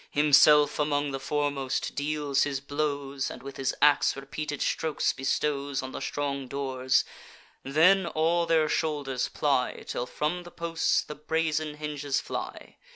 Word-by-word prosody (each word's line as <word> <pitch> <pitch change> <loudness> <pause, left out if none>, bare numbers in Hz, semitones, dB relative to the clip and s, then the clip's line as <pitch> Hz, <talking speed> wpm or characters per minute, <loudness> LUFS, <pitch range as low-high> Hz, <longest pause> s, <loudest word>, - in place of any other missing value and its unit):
Himself, 150 0 +5
among 145 -1 0
the 135 - -4
foremost, 140 -2 -2
deals 145 -1 0
his 140 -2 0
blows, 140 -1 -2
And - - -9
with 140 0 -8
his 135 -1 -1
ax 150 0 +4
repeated 145 +1 -5
strokes 160 -2 0
bestows 140 0 -1
On 130 - -6
the - - -6
strong 140 -2 -3
doors; 130 -1 0 0.6
then 170 +7 +4
all 170 +1 +1
their 160 -2 +3
shoulders 145 -6 -1
ply, 135 -4 0
Till 120 - -3
from 155 +4 -2
the 175 - -11
posts 165 -1 0
the - - -7
brazen 155 0 -1
hinges 150 -2 -2
fly. - - -7
145 Hz, 145 wpm, -27 LUFS, 140-155 Hz, 0.6 s, Himself